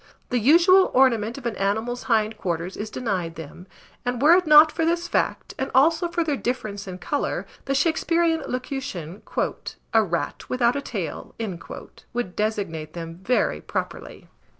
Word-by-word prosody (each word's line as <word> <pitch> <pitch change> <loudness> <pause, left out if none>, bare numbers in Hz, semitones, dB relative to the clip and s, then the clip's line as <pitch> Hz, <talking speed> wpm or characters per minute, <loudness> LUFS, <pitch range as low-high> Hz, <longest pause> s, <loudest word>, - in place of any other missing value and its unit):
The 245 - +1
usual 345 - +6
ornament 235 -3 +3
of 270 - -10
an 235 - -1
animal's 220 +5 -1
hind 220 -1 +2
quarters 175 -2 -3
is 210 +1 -5
denied 185 -9 -3
them; 165 +3 -10 0.4
and 245 -1 -2
were 300 +6 +6
it 360 -1 +3
not 305 +1 +8
for 325 - -2
this 340 +1 0
fact, - - -1
and 265 - -1
also 325 +6 +4
for 340 0 -1
their 300 -3 0
difference 215 -6 -4
in 185 -1 -6
colour, 285 +9 -2 0.2
the 275 - 0
Shaksperean 330 +2 +2
locution, 250 - -5 0.7
"a 225 -1 +5
rat 170 -4 -3
without 245 -1 +2
a 280 - -1
tail," 195 - -5 0.8
would 235 -7 -3
designate 195 -8 -2
them 165 0 -7
very 250 +6 +1
properly. - - -5
245 Hz, 155 wpm, -24 LUFS, 195-295 Hz, 0.8 s, not